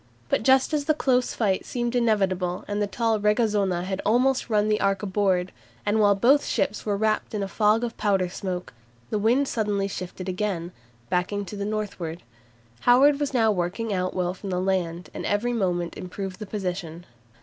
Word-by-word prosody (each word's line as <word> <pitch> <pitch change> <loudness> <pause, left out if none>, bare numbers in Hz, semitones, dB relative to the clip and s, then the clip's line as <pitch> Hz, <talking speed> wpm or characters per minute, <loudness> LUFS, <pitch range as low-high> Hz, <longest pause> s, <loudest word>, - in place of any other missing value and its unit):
But - - +2
just 265 +6 +4
as 295 -2 0
the 310 0 +2
close 255 -4 +1
fight 200 -5 +1
seemed 240 0 -2
inevitable 195 -6 +1
and 205 0 -2
the 205 - +1
tall 225 +2 0
"Regazona" 210 -4 +1
had 190 +1 -3
almost 250 +4 +2
run 210 -1 +2
the 215 0 +1
"Ark" 195 0 +1
aboard, 190 -2 +1 0.3
and 210 +2 +2
while 205 -1 +5
both 265 +8 +4
ships 205 0 -1
were 205 -1 +1
wrapped 215 +1 0
in 205 - -1
a - - -2
fog 215 +3 +2
of 235 -1 -3
powder 195 -3 +1
smoke, 180 0 -5 0.4
the 210 - 0
wind 245 +7 +3
suddenly 205 -4 0
shifted 185 -1 -6
again, 185 -2 -2 0.4
backing 200 +3 0
to 200 - -8
the 200 0 -3
northward. 200 -6 -4 0.6
Howard 275 - +5
was 290 -1 -1
now 225 -4 +3
working 200 +4 -2
out 185 -1 -1
well 180 -1 0
from 195 +1 -8
the 180 -1 -1
land, 180 -2 -1
and - - -5
every 220 +4 0
moment 175 -6 -1
improved 185 +1 -6
the 215 - -6
position. 180 -4 -4
205 Hz, 185 wpm, -25 LUFS, 185-225 Hz, 0.6 s, while